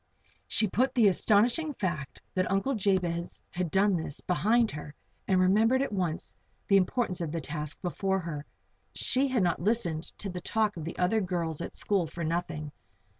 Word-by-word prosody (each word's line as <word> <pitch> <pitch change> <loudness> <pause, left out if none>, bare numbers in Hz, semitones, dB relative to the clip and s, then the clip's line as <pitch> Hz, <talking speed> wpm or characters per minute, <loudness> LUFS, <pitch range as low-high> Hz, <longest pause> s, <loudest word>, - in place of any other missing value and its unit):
She 215 - +3
put 255 +7 +1
the 230 -4 +6
astonishing 235 - +2
fact 155 -10 -3
that 185 -1 0
Uncle 195 +8 +1
Jabez 185 -5 0
had 180 -1 -2
done 195 +2 +3
this, 160 -4 -4
behind 220 +5 +2
her, 150 0 -8 0.3
and 190 -1 +3
remembered 220 +8 +4
at 275 - -3
once 180 -5 -2 0.3
the 195 - +3
importance 190 0 +1
of 165 -3 -2
the 165 - -2
task 150 -2 -5
before 190 +2 0
her. 155 -4 -5 0.5
She 265 +2 +1
had 255 -6 +1
not 175 -2 +1
listened 180 -6 0
to 205 - -3
the 180 -2 -5
talk 215 +2 +1
of 160 -3 -6
the 165 - -6
other 185 +5 +2
girls 170 -4 -2
at - - -6
school 195 -5 +1
for 170 +2 -6
nothing. 155 -2 -2
185 Hz, 175 wpm, -29 LUFS, 170-215 Hz, 0.5 s, the